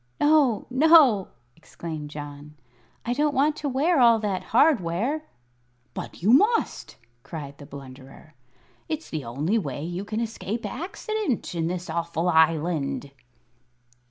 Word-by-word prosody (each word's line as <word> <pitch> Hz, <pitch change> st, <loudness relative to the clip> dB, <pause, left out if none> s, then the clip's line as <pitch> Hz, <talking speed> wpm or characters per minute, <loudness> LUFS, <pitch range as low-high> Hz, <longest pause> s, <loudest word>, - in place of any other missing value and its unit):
"No, 290 Hz, -7 st, +3 dB
no!" 270 Hz, -, +6 dB, 0.3 s
exclaimed 155 Hz, -2 st, -8 dB
John. 145 Hz, 0 st, -9 dB, 0.5 s
"I 240 Hz, -, 0 dB
don't 295 Hz, +2 st, 0 dB
want 295 Hz, +3 st, +3 dB
to 295 Hz, -2 st, -3 dB
wear 290 Hz, +5 st, +2 dB
all 235 Hz, -2 st, +6 dB
that 200 Hz, -4 st, -2 dB
hardware." 245 Hz, -, +2 dB, 0.7 s
"But -, -, -8 dB
you 215 Hz, +5 st, +5 dB
must!" 430 Hz, -, +2 dB, 0.3 s
cried 140 Hz, 0 st, -8 dB
the 145 Hz, -, -11 dB
Blunderer. 135 Hz, +2 st, -12 dB, 0.6 s
"It's 315 Hz, 0 st, -4 dB
the 155 Hz, -3 st, -3 dB
only 150 Hz, -, 0 dB
way 145 Hz, -5 st, -5 dB
you 175 Hz, +3 st, -4 dB
can 215 Hz, +2 st, -4 dB
escape 225 Hz, -1 st, -4 dB
accident 395 Hz, -, -3 dB
in 165 Hz, -1 st, -1 dB
this 180 Hz, 0 st, -4 dB
awful 170 Hz, +1 st, -1 dB
Island." 160 Hz, -3 st, +1 dB
195 Hz, 130 wpm, -25 LUFS, -, 0.7 s, no